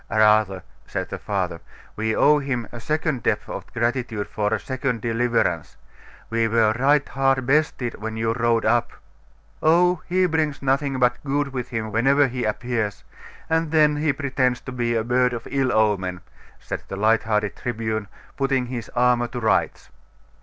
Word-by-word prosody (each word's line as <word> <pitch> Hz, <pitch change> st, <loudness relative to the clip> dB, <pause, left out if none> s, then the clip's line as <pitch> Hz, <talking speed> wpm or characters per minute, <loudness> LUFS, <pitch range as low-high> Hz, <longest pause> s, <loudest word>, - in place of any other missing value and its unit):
'Rather,' 105 Hz, -4 st, +3 dB, 0.2 s
said -, -, -4 dB
the -, -, -5 dB
father, 90 Hz, -4 st, -3 dB, 0.3 s
'we 110 Hz, +1 st, -1 dB
owe 150 Hz, 0 st, +5 dB
him 130 Hz, -5 st, -3 dB
a 120 Hz, -, -8 dB
second 155 Hz, 0 st, -1 dB
debt -, -, +1 dB
of -, -, -7 dB
gratitude 120 Hz, -3 st, -1 dB
for 105 Hz, -1 st, -2 dB
a 110 Hz, -, +1 dB
second 130 Hz, -2 st, -2 dB
deliverance. 115 Hz, -7 st, 0 dB, 0.5 s
We 115 Hz, 0 st, +2 dB
were 110 Hz, -1 st, +3 dB
right 145 Hz, +2 st, +3 dB
hard 135 Hz, -1 st, +1 dB
bested 135 Hz, -3 st, +1 dB
when 110 Hz, 0 st, -4 dB
you 115 Hz, 0 st, 0 dB
rode 120 Hz, -1 st, +1 dB
up.' 120 Hz, +2 st, +2 dB, 0.7 s
'Oh, 175 Hz, +2 st, +4 dB
he 185 Hz, +1 st, +2 dB
brings 155 Hz, -4 st, -1 dB
nothing 135 Hz, 0 st, +1 dB
but 125 Hz, -1 st, +1 dB
good 145 Hz, 0 st, 0 dB
with 125 Hz, -1 st, -4 dB
him 110 Hz, -2 st, -3 dB
whenever 135 Hz, +6 st, +4 dB
he 125 Hz, -1 st, -3 dB
appears; 110 Hz, -1 st, -2 dB, 0.4 s
and 160 Hz, 0 st, +1 dB
then 150 Hz, -1 st, +4 dB
he 150 Hz, 0 st, +2 dB
pretends 130 Hz, -3 st, 0 dB
to 125 Hz, -, -8 dB
be 120 Hz, -2 st, -1 dB
a 110 Hz, -, +1 dB
bird 125 Hz, +1 st, +2 dB
of 115 Hz, -1 st, -6 dB
ill 135 Hz, -2 st, +1 dB
omen,' 95 Hz, -5 st, +1 dB, 0.4 s
said -, -, -5 dB
the -, -, -5 dB
light 110 Hz, +2 st, +3 dB
hearted 105 Hz, -2 st, -1 dB
Tribune, 110 Hz, -3 st, -3 dB, 0.3 s
putting 135 Hz, -2 st, +1 dB
his 120 Hz, -2 st, -6 dB
armour 120 Hz, 0 st, +3 dB
to 120 Hz, 0 st, -6 dB
rights. 110 Hz, -2 st, 0 dB
120 Hz, 165 wpm, -23 LUFS, 110-135 Hz, 0.7 s, owe